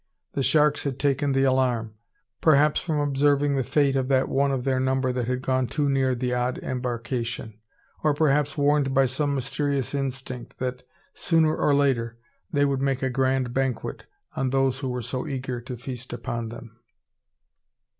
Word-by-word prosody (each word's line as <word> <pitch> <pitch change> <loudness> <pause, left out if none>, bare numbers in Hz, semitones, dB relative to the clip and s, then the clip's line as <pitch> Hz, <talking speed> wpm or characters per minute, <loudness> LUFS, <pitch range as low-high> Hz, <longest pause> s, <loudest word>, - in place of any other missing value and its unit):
The 140 - -1
sharks 150 +1 +3
had 135 -3 -2
taken 140 0 +1
the 135 0 +2
alarm; 125 -4 +1 0.5
perhaps 150 -1 +4
from 155 -3 -1
observing 145 0 +2
the 135 - +1
fate 140 +1 +2
of 130 -1 0
that 130 -1 +2
one 140 +1 +2
of 130 -2 -1
their 130 -1 +1
number 130 0 +1
that 125 -2 -2
had 125 +1 -2
gone 130 -1 +1
too 145 +2 0
near 135 -2 +2
the 125 0 -1
odd 125 +1 0
embarkation; 120 -3 -3 0.4
or, 150 -2 +2
perhaps, 150 -1 +2
warned 145 -1 +2
by 135 0 +5
some 140 +3 0
mysterious 135 +1 -1
instinct, 130 -3 -4
that, 125 0 -3 0.3
sooner 160 -2 +2
or 145 - +2
later, 120 -5 +1 0.3
they 145 -2 +3
would 135 -1 0
make 135 -1 0
a 130 - 0
grand 130 -1 0
banquet 135 -2 -2 0.3
on 135 -1 0
those 135 -1 +1
who 135 -2 -3
were 125 -1 -3
so 125 +2 -3
eager 130 -3 -4
to 125 +1 -7
feast 125 0 -7
upon 115 -1 -4
them. 115 0 -11
130 Hz, 175 wpm, -25 LUFS, 125-140 Hz, 0.5 s, by